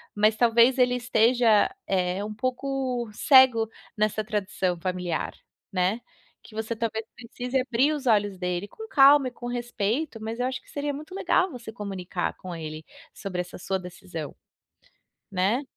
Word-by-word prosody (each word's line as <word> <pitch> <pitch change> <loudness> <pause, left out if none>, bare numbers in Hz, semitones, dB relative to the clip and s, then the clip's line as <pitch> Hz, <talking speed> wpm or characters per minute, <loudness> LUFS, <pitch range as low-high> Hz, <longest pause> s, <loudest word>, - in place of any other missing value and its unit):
mas 215 +1 +4
talvez 235 +3 +4
ele 250 0 +4
esteja, 235 -2 +4 0.2
eh, 185 0 0
um 215 - -5
pouco 255 +1 -2
cego 255 -3 +6 0.3
nessa 215 0 0
tradição 195 -4 -1
familiar, 180 -2 -2 0.4
né, 190 +5 0 0.4
que - - -15
você 220 +1 -3
talvez 220 -1 -2
precise 245 +2 -4
abrir 265 +4 +2
os 285 -3 -5
olhos 205 -5 +2
dele, 180 +1 -2
com 445 - -10
calma 275 -3 +6
e - - -21
com 240 0 -8
respeito, 240 +2 -2
mas 225 +2 -4
eu - - +1
acho 255 0 -3
que - - -24
seria 290 0 -3
muito 310 +6 -8
legal 375 -1 +2
você 245 -6 -8
comunicar 195 -5 -4
com 185 -1 -8
ele 155 -1 -6 0.3
sobre 190 -3 -5
essa 180 0 -5
sua 190 +1 -2
decisão. 180 -3 -8 1.0
Né. 195 +8 +1
225 Hz, 155 wpm, -26 LUFS, 190-250 Hz, 1.0 s, cego